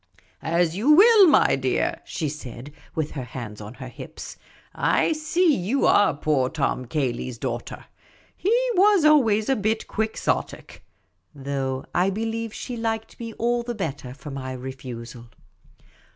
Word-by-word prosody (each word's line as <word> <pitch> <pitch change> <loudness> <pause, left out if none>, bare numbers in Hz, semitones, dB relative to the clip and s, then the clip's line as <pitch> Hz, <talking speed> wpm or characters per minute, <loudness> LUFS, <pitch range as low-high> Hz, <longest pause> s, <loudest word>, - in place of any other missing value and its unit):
" 95 - -37 0.2
As 170 -1 +2
you 220 +9 0
will, 415 +3 +8
my - - +5
dear," - - -1
she 160 - -3
said, 140 -2 -8 0.2
with 155 -2 -2
her 135 - -5
hands 115 -4 -8
on 105 +4 -9
her 130 0 -8
hips; 125 - -9 0.4
"I - - +2
see 315 +1 +2
you 215 +10 0
are 205 -8 +4
poor 145 -3 +1
Tom 140 -4 -1
Cayley's 125 -3 -2
daughter. - - -5 0.5
He 385 - -2 0.2
was 395 -4 +4
always 225 -9 +4
a 270 - +3
bit 215 +1 -1
Quixotic." 220 0 -3 0.5
Though 135 -1 -3
I 180 +2 +2
be 215 +4 -2
lieve 225 0 -3
she 245 +3 -6
liked 225 -1 -3
me 230 -1 -6
all 240 +2 0
the 240 0 -5
better 140 -10 -4
for 145 +1 -9
my 130 -1 -5
refusal. 125 -2 -8
165 Hz, 150 wpm, -24 LUFS, -, 0.5 s, will